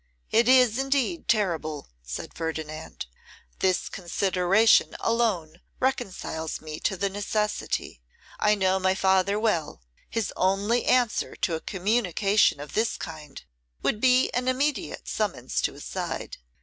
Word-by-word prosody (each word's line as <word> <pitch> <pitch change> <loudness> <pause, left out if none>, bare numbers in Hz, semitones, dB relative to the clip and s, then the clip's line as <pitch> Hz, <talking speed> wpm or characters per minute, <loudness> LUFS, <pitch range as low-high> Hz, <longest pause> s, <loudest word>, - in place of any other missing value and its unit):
'It 230 +1 +4
is, 250 -2 +5
indeed, 275 +4 0
terrible,' 165 -9 0
said - - -6
Ferdinand. 160 -2 -5 0.5
'This 185 -1 +1
consideration 190 +3 +2
alone 190 -9 0 0.2
reconciles 195 - -2
me 155 0 -7
to 190 - -1
the 200 - 0
necessity: 205 - -2 0.4
I 210 0 +4
know 190 -1 +2
my 190 0 +2
father 190 +2 +2
well; 170 - -1 0.3
his 225 -3 -2
only 200 +6 +1
answer 245 -3 +2
to 170 - -1
a 160 - -1
communication 200 -2 +2
of 145 +1 -8
this 225 +2 0
kind 155 -3 -8 0.4
would 215 - 0
be 255 0 +4
an 250 +1 -1
immediate 275 +2 -1
summons 180 - -2
to - - -1
his - - -10
side. - - -4
200 Hz, 130 wpm, -26 LUFS, 170-230 Hz, 0.5 s, is